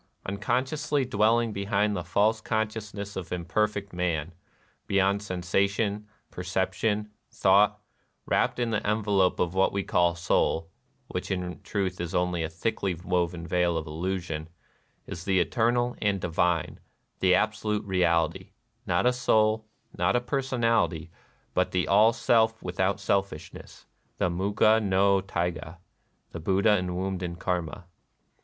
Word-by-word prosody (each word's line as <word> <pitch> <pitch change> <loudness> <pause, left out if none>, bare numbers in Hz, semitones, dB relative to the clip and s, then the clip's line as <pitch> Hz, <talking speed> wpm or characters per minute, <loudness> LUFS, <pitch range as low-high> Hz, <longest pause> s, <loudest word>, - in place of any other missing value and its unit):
Unconsciously 130 +8 -1
dwelling 115 0 +2
behind 105 +1 0
the 90 - -3
false 105 +6 +1
consciousness 105 -2 -3
of 90 -3 -6
imperfect 100 +3 -1
man, 85 -2 -2 0.3
— - - -38
beyond 100 +1 +2
sensation, 100 +2 -1 0.2
perception, 95 +4 -1 0.2
thought, 100 +2 +3 0.3
— - - -47
wrapped - - +1
in 120 -2 -1
tlie 110 - 0
envelope 105 -3 +1
of 85 -1 0
what 95 0 +3
we 100 0 -1
call 85 -2 +2
soul 85 -1 0 0.4
(which 90 - -4
in 90 -1 -3
truth 95 -2 -2
is 85 -1 -4
only 90 -1 0
a 80 - -2
thickly 95 +2 -2
woven 85 -1 -2
veil 85 0 +1
of 80 - -3
illusion), 80 -1 -4 0.6
is 85 - -7
the 95 0 +2
eternal 120 +5 +1
and 100 -2 +1
divine, 85 -1 0 0.4
the 90 -1 +4
Absolute 105 0 0
Real 90 -4 +3
ity: 95 +5 -13 0.3
not 90 +3 +1
a 125 - +4
soul, 110 -3 +2 0.3
not - - +1
a - - +4
personality, 115 - 0 0.4
but - - +1
the 90 -1 0
All 105 +4 +6
Self 115 -1 +2
without 95 +3 0
selfishness, 95 -5 -3 0.2
— - - -43
the 90 - +1
Muga 100 +4 +3
no 100 -1 +3
Taiga, 85 -3 -3 0.3
— - - -44
the 85 - -6
Buddha 100 +5 +3
enwombed 90 +1 -3
in 85 -1 -4
Karma. 90 +1 -3
95 Hz, 140 wpm, -27 LUFS, 90-105 Hz, 0.6 s, All